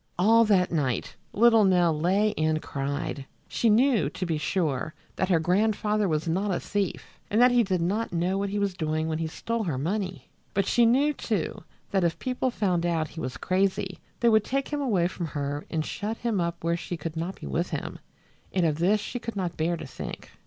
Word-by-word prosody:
All 225 +5 +5
that 190 -4 +3
night 140 -7 -1 0.2
little 225 0 +5
Nell 180 -4 +4
lay 195 +7 +2
and 155 0 +1
cried. 140 -1 -4 0.2
She 230 - +1
knew, 230 - +4
to 185 - -4
be 160 -3 -1
sure, 155 -4 -1 0.2
that 185 - 0
her 175 - +5
grandfather 210 +4 +1
was 155 -1 -1
not 190 +5 0
a 180 - 0
thief 200 -3 -3
and 215 - +2
that 250 +1 +7
he 245 -1 +5
did 185 -5 0
not 205 +7 -1
know 175 +2 0
what 200 0 -1
he 205 - -2
was 200 -2 0
doing 155 -2 -1
when 160 0 -2
he 165 - -1
stole 230 +7 -3
her 155 -7 -1
money; 185 +5 -3 0.3
but 200 -1 +2
she 235 +3 +4
knew, 280 +6 +3
too, 215 - -3 0.3
that 195 -2 +2
if 170 -1 +1
people 255 0 -1
found 185 -8 0
out 165 -3 0
he 165 - -9
was 130 -6 -4
crazy 190 - 0 0.2
they 235 - +5
would 220 -2 +4
take 275 +3 -2
him 295 -1 -2
away 200 -11 +2
from 175 -2 -4
her 145 0 -4
and 155 -1 -1
shut 215 +2 -4
him 225 -6 -1
up 170 -1 -3
where 170 0 +1
she 175 0 -5
could 160 +1 -5
not 170 +4 -4
be - - -8
with 70 -1 -1
him, - - -5 0.5
and 185 -3 +1
of 155 -1 0
this 200 +5 +3
she 245 +4 -5
could 230 -2 -6
not 180 -4 -2
bear 170 +2 0
to 160 - -7
think. 130 - -8
185 Hz, 215 wpm, -27 LUFS, 160-215 Hz, 0.5 s, that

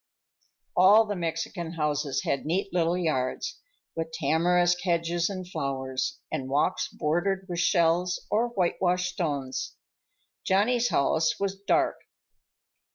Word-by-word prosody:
All 205 +5 +7
the 205 -1 -3
Mexican 165 0 -3
houses 150 -4 -1
had 140 - -1
neat 185 +5 -1
little 175 0 +2
yards, 130 -8 -2 0.4
with 165 0 -3
tamarisk 175 +3 +2
hedges 170 0 0
and 185 -2 -6
flowers, 135 -5 -3
and 130 0 -3
walks 150 +7 +1
bordered 185 +5 -1
with 175 -2 -3
shells 175 0 +2
or 225 +3 +2
whitewashed 180 -4 0
stones. 145 -7 -3 0.7
Johnny's 230 +5 +2
house 160 +3 +1
was 195 -1 -1
dark. 200 +1 +1
175 Hz, 115 wpm, -27 LUFS, 155-185 Hz, 0.7 s, All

